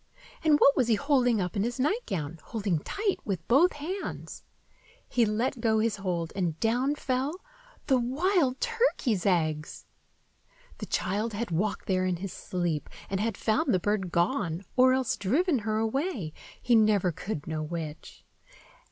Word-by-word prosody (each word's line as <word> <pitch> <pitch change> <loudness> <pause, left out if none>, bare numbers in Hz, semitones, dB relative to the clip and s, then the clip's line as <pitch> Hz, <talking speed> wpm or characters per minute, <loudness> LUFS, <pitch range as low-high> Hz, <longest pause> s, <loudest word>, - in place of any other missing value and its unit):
And 310 -2 +5
what 280 - +6
was 255 -4 +2
he 230 - +4
holding 250 -3 +2
up 180 -2 -2
in 200 - +1
his 240 +4 -2
nightgown, 195 - -1
holding 200 -7 -1
tight 400 - -2
with 185 -5 -4
both 310 +9 +5
hands? 350 +7 -6 0.6
He 240 -2 +2
let 230 +4 -1
go 220 -1 +3
his 220 -1 +1
hold, 175 -4 -3
and 175 -5 -1
down 250 +6 +1
fell—the 300 - -2
wild 270 +2 +1
turkey's 460 - +1
eggs! 155 -4 0 0.9
The - - -5
child 210 +4 -1
had 215 -1 -3
walked 200 +5 -1
there 185 -1 +1
in 180 - 0
his 185 +2 -6
sleep, 175 -5 -3 0.2
and 195 - 0
had 220 0 -1
found 260 +6 +1
the - - +2
bird 190 -2 -1
gone, 175 - 0
or 255 0 +6
else 260 -2 +1
driven 285 - +1
her 215 0 -1
away, 225 - -1 0.3
he 245 - +1
never 210 -5 +4
could 160 -2 -5
know 160 -1 -3
which. 155 -1 -6
220 Hz, 155 wpm, -28 LUFS, 180-270 Hz, 0.9 s, what